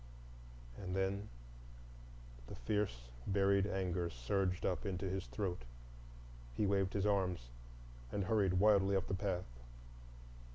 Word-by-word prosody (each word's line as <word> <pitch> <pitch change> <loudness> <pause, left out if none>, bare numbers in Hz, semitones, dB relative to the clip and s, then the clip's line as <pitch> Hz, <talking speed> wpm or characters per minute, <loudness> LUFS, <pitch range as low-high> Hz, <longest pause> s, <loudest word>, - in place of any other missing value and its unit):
And 90 -1 -3
then 95 +2 -1 1.2
the - - -7
fierce, - - -1 0.2
buried 100 0 +3
anger 90 -3 -1
surged 90 +8 0
up 90 +1 0
into 95 -2 -2
his 95 +1 -2
throat. 95 -4 -2 1.0
He - - +3
waved 95 -1 +2
his 100 -1 +1
arms 90 -10 +1 0.6
and 100 - 0
hurried 95 -2 +2
wildly 100 0 +5
up 95 - +1
the - - -2
path. 95 -2 -1
95 Hz, 120 wpm, -37 LUFS, 90-100 Hz, 1.2 s, wildly